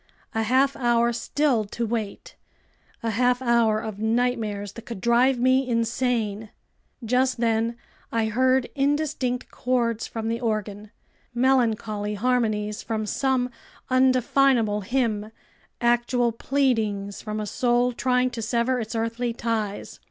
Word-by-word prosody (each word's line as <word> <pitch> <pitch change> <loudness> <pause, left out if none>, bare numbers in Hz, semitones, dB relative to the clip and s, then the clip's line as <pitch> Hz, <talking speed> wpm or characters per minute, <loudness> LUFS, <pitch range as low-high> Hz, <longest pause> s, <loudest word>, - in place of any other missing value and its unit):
A 225 - 0
half 260 +5 +2
hour 235 -1 +2
still 250 0 +1
to 230 +3 -4
wait! 220 -3 -4 0.7
A 225 - 0
half 245 +3 +2
hour 235 -3 +2
of 215 -2 -6
nightmares 220 -3 -1
that 230 - -12
could 230 -5 -6
drive 240 +5 +3
me 260 +1 +2
insane! 230 -2 -1 0.6
Just 255 +2 +1
then 230 0 +1 0.4
I 225 -1 +1
heard 255 +3 +2
indistinct 280 -3 -1
chords 235 -3 -1
from 225 -1 -5
the 230 +1 -1
organ, 215 -3 -3 0.5
melancholy 225 -5 +1
harmonies 215 -2 0
from 220 -1 -3
some 255 +2 0 0.4
undefinable 255 -4 +3
hymn, 215 -1 -1 0.5
actual 240 0 +2
pleadings 225 -6 -1
from 215 -1 -4
a 210 - -3
soul 245 +3 +1
trying 250 +1 +1
to 235 -1 -5
sever 235 +3 0
its 225 0 -5
earthly 230 +1 -1
ties. 220 -3 -3
235 Hz, 125 wpm, -25 LUFS, 220-250 Hz, 0.7 s, drive